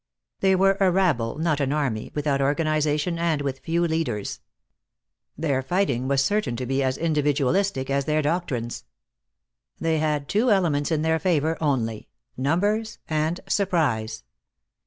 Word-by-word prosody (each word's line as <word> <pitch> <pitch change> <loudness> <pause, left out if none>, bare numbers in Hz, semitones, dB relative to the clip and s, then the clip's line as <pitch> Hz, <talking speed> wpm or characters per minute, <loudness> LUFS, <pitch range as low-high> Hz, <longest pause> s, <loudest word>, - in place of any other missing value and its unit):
They 190 -1 +3
were 195 +1 +3
a 195 -2 +4
rabble, 160 -11 +1
not 155 -2 0
an 140 -1 0
army, 135 -8 -1
without 145 -2 0
organization 155 +2 +1
and 165 -3 +1
with 135 -1 -3
few 170 +3 0
leaders. 155 -11 -2 1.0
Their 145 -4 0
fighting 130 -4 0
was 135 0 +2
certain 205 - 0
to 125 +2 -4
be 135 +2 0
as 130 -1 0
individualistic 150 0 +1
as 140 0 +1
their 155 0 +1
doctrines. 145 -7 -2 0.9
They 160 -1 +1
had 150 -2 0
two 225 +5 +2
elements 165 -8 +2
in 155 -1 +1
their 160 0 +2
favor 160 -2 +1
only, 120 -8 -1 0.3
numbers 205 - 0
and 155 +2 -1
surprise. 150 - 0
150 Hz, 140 wpm, -24 LUFS, 135-170 Hz, 1.0 s, a